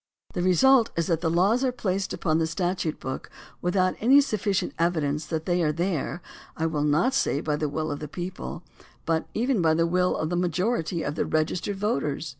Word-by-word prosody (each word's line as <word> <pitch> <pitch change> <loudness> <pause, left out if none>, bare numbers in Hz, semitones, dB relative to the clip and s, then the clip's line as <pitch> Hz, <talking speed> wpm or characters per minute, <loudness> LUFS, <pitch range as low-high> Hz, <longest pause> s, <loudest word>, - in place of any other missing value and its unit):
The 175 - -2
result 230 +7 +5
is 170 - +1
that 165 0 -1
laws 185 +10 +2
are 260 - +2
placed 195 -5 -2
upon 160 -2 0
the 160 - +1
statute 175 -2 -2
book 130 0 -5 0.3
without 185 +1 +2
any 260 +6 +6
sufficient 210 -8 0
evidence 155 -3 0
that 160 -1 -3
they 175 0 +1
are 155 -2 +2
there 170 +1 -2 0.2
— - - -21
I 160 - 0
will 155 -2 -1
not 155 - +2
say 145 - +1
by 150 -1 -1
the 150 0 -2
will 155 +1 -2
of 145 - -4
the 150 - -6
people, 175 +2 -6 0.4
but 165 -1 0
even 240 -2 +1
by 160 -1 +3
the 165 +1 +2
will 180 +2 +1
of 155 +1 -2
the - - 0
majority 175 -1 0
of 145 - -2
the - - -2
registered 160 +6 -1
voters. 160 -7 -1
175 Hz, 205 wpm, -26 LUFS, 155-190 Hz, 0.4 s, any